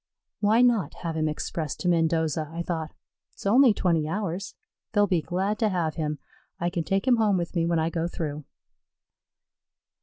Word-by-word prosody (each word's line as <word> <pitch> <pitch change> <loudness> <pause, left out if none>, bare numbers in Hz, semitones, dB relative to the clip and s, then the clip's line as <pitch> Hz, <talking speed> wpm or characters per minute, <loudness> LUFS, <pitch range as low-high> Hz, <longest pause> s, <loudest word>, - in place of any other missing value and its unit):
"Why 220 +4 +4
not 230 -11 +2
have 165 -1 -2
him 155 -1 0
expressed 155 0 -3
to - - -1
Mendoza?" 160 -2 +1
I 170 +1 -4
thought. 160 -3 -4 0.4
"It's - - -14
only 245 +5 +6
twenty 170 -6 +1
hours; 190 0 -3 0.4
they'll 205 -1 +4
be 180 -4 +1
glad 190 +6 -1
to 220 - +2
have 170 -5 -1
him. 150 -2 -2 0.4
I 175 +1 -1
can 170 -1 -1
take 195 +8 -1
him 250 -2 +5
home 210 -4 +3
with 175 +1 -4
me 165 -1 +1
when 170 0 +1
I 160 +1 0
go 165 0 -1
through." 155 -4 -4
170 Hz, 180 wpm, -26 LUFS, 160-200 Hz, 0.4 s, only